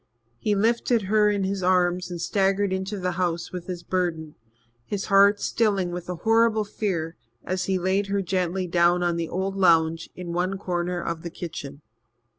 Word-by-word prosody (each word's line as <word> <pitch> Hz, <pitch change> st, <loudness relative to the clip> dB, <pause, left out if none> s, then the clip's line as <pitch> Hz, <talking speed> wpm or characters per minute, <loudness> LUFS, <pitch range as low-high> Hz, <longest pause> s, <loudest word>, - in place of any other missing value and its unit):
He 210 Hz, -, +1 dB
lifted 230 Hz, +2 st, +2 dB
her 210 Hz, +2 st, +3 dB
in 200 Hz, -1 st, 0 dB
his 195 Hz, 0 st, -2 dB
arms 180 Hz, 0 st, +2 dB
and 175 Hz, -1 st, -5 dB
staggered 195 Hz, +2 st, +1 dB
into 190 Hz, +2 st, -3 dB
the 180 Hz, -1 st, -1 dB
house 170 Hz, -1 st, -1 dB
with 180 Hz, -2 st, -7 dB
his 175 Hz, -2 st, -5 dB
burden, 170 Hz, -5 st, -2 dB, 0.5 s
his 200 Hz, -, -4 dB
heart 200 Hz, +1 st, +6 dB
stilling 200 Hz, -6 st, 0 dB
with 175 Hz, 0 st, -6 dB
a 180 Hz, -, -2 dB
horrible 225 Hz, -1 st, +4 dB
fear 175 Hz, -6 st, -3 dB, 0.3 s
as 185 Hz, 0 st, -2 dB
he 190 Hz, 0 st, +1 dB
laid 190 Hz, +2 st, 0 dB
her 200 Hz, 0 st, 0 dB
gently 185 Hz, 0 st, -1 dB
down 175 Hz, 0 st, +3 dB
on 175 Hz, -1 st, +1 dB
the 170 Hz, -1 st, -3 dB
old 190 Hz, +2 st, -2 dB
lounge 165 Hz, -3 st, +3 dB
in 175 Hz, -2 st, -6 dB
one 185 Hz, +3 st, -1 dB
corner 180 Hz, -1 st, -2 dB
of 170 Hz, -1 st, -4 dB
the 170 Hz, -, -5 dB
kitchen. 150 Hz, -4 st, -8 dB
185 Hz, 180 wpm, -25 LUFS, 175-195 Hz, 0.5 s, heart